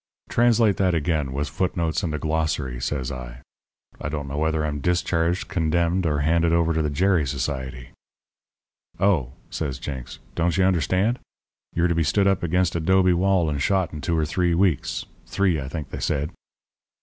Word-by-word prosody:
"'Translate 115 -3 +3
that 90 -3 +2
again, 75 -3 0
with 70 +2 -2
foot 90 +3 -2
notes 85 0 0
and 85 -5 -2
a - - -1
glossary,' 75 -6 -1
says 65 -1 -2
I. 60 0 -8 0.6
'I 75 - -3
don't 75 -2 -4
know 70 +2 -3
whether 80 0 +1
I'm 75 -1 -2
discharged, 90 +1 0
condemned, 85 +2 +1
or 75 -2 0
handed 85 +2 +2
over 85 -1 +2
to 80 - +1
the 75 - 0
Gerry 85 0 +2
Society.' 65 -2 -4 1.1
"'Oh,' 85 -11 +2 0.2
says 70 -5 -3
Jenks, 65 -1 -6 0.2
'don't 85 0 0
you 95 - +4
understand? 95 - +2 0.6
You're 85 +1 +3
to 85 - +1
be 85 - +1
stood 100 +6 +2
up 95 -2 +2
against 90 +1 +1
a - - +1
'dobe 95 +2 +4
wall 90 -1 +2
and 75 -2 -1
shot 95 +1 +1
in 75 - -6
two 85 +1 0
or 80 - +2
three 85 +1 +1
weeks 85 -8 +1 0.2
three, 95 -6 +1
I 65 - -5
think, 75 0 -6
they - - -5
said.' 75 +2 -1
80 Hz, 185 wpm, -24 LUFS, 75-90 Hz, 1.1 s, you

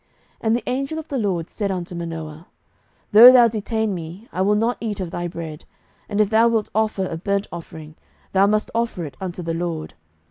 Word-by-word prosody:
07:013:016 - - -42 0.4
And 220 - +4
the 240 - -2
angel 275 +5 -2
of 320 - -6
the 280 - -2
LORD 180 -6 -1
said 205 -2 -2
unto 180 -1 -4
Manoah, 165 -1 -6 0.6
Though 230 +4 +11
thou 245 -2 +7
detain 220 -1 -2
me, 175 +5 -8
I 185 - -1
will 205 +2 +3
not 230 +3 +1
eat 215 -3 -3
of 180 -3 -4
thy 175 0 -3
bread: 165 -3 -7 0.5
and 205 -1 -2
if 210 0 +3
thou 225 +1 +5
wilt 225 -2 0
offer 215 -3 0
a 165 - -4
burnt 200 +3 -1
offering, 160 -2 -9 0.4
thou 195 +1 +4
must 215 +1 0
offer 230 -7 -1
it 140 -3 -9
unto 180 -1 -5
the 165 0 -2
LORD. 165 - -4
200 Hz, 210 wpm, -22 LUFS, 170-220 Hz, 0.6 s, Though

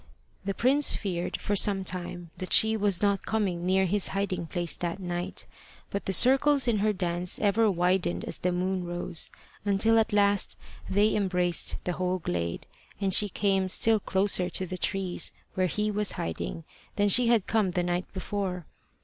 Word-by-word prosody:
The 195 0 -3
prince 275 +4 +3
feared 180 -4 -3
for 205 - -2
some 195 -1 +3
time 175 -2 -6
that 185 - -1
she 220 0 +5
was 205 -3 +1
not 200 -2 0
coming 185 -5 -1
near 190 +1 +2
his 200 +2 0
hiding 190 -4 -2
place 175 -1 -3
that 175 +2 -4
night; 175 0 -4 0.5
but 200 - -4
the - - -1
circles 270 +6 +4
in 225 -3 +1
her 215 +1 +2
dance 180 -2 -1
ever 215 +2 +2
widened 180 -1 0
as - - -6
the 180 - 0
moon 185 +1 -2
rose, 175 -1 -3 0.3
until 210 +3 +3
at 220 - 0
last 205 -1 +1 0.3
they 205 +3 +2
embraced 180 -4 +1
the 180 - -2
whole 185 +2 -1
glade, 85 - -4 0.3
and 195 -2 -1
she 205 +2 +7
came 195 -2 0
still 220 +3 +3
closer 190 -2 +1
to 185 - -3
the 185 - -6
trees 185 0 -1 0.2
where 185 0 0
he 210 +5 -1
was 210 0 +1
hiding 80 -2 -5 0.3
than 205 0 +2
she 240 +5 +6
had 230 -4 +3
come 215 -4 +1
the 180 0 -1
night 175 +1 -3
before. 190 -2 -4
190 Hz, 175 wpm, -27 LUFS, 180-205 Hz, 0.5 s, she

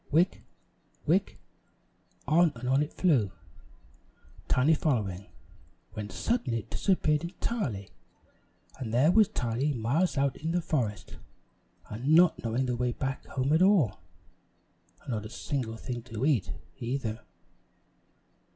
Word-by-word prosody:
"Wick 165 +5 +2 0.6
wick!" - - +1 0.9
On 165 +3 +4
and 120 +2 -6
on 135 +2 +3
it 150 - -2
flew, 130 - +2 1.2
Tiny 135 +5 +4
following, 105 - -1 0.7
when 105 -1 -5
suddenly 125 - -1
it - - -22
disappeared 155 -6 +1
entirely, 170 - -3 0.9
and 120 -5 -4
there 130 +8 +4
was 215 +1 +6
Tiny 135 - -1
miles 140 +10 +1
out 135 -1 +1
in 160 +2 -3
the 175 - +1
forest, 115 -11 -2 0.7
and 130 +9 +2
not 175 0 +5
knowing 120 +3 0
the 125 -1 -1
way 125 0 0
back 135 +2 -3
home 135 +2 0
at 160 - +4
all. 185 - +4 1.0
And - - -6
not 110 -2 -3
a - - -13
single 120 -2 -3
thing 120 0 -5
to 115 +1 -3
eat, 140 - +2 0.3
either. 115 -2 -3
130 Hz, 130 wpm, -29 LUFS, 115-160 Hz, 1.2 s, was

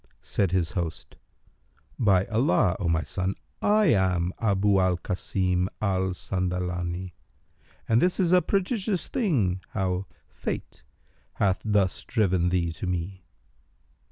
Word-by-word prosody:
Said 95 -4 0
his 90 -3 +1
host, 85 -6 -4 0.8
"By 95 -4 +4
Allah, 110 - +2
O 90 - -1
my 80 -1 +1
son, 95 +1 -2 0.3
I 210 +1 +4
am 90 -3 +1
Abu 100 -2 +2
al 95 -1 +2
Kasim 90 0 -1
al 95 -3 0
Sandalani, 90 -1 -3 0.7
and 115 +1 +3
this 180 +2 +2
is 180 -3 +2
a 180 0 +6
prodigious 195 +1 0
thing 125 - 0
how 95 0 -1 0.2
Fate - - -6 0.5
hath 95 -1 +1
thus 100 -4 +1
driven 95 -6 +1
thee 85 -2 0
to 85 +3 -5
me!" 90 +1 -4
95 Hz, 125 wpm, -26 LUFS, 90-110 Hz, 0.8 s, a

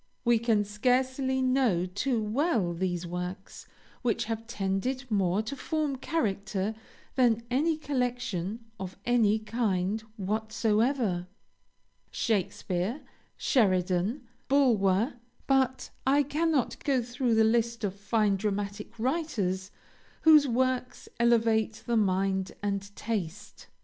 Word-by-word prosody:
We 235 -1 +4
can 220 -3 +2
scarcely 260 +5 +1
know 255 -9 +2
too 220 +7 -1
well 220 - +1
those 175 0 -2
works 180 +3 -6 0.3
which 240 -3 0
have 225 0 -4
tended 235 +5 -2
more 195 0 +2
to 230 +6 -5
form 300 -1 -2
character 210 -8 -1 0.4
than 235 -3 +3
any 305 +5 +2
collection 245 - -2
of 190 -1 -6
any 225 -3 +3
kind 215 -2 -1 0.2
whatsoever. 215 0 0 0.8
Shakespeare, 195 - -1 0.4
Sheridan, 190 - +1 0.2
Bulwer, 235 -4 +3 0.3
but 265 -1 +1 0.2
I 285 +2 +5
cannot 300 0 0
go 270 -4 +2
through 245 0 0
the 220 - +5
list 230 +1 +1
of 200 -3 0
fine 205 0 +1
dramatic 205 +2 -3
writers 220 - -1 0.5
whose 305 -3 +7
works 255 +1 -1
elevate 225 -2 +2
the 235 - 0
mind 190 -2 +1
and 200 -1 0
taste. 205 -3 -5
225 Hz, 110 wpm, -29 LUFS, 195-255 Hz, 0.8 s, whose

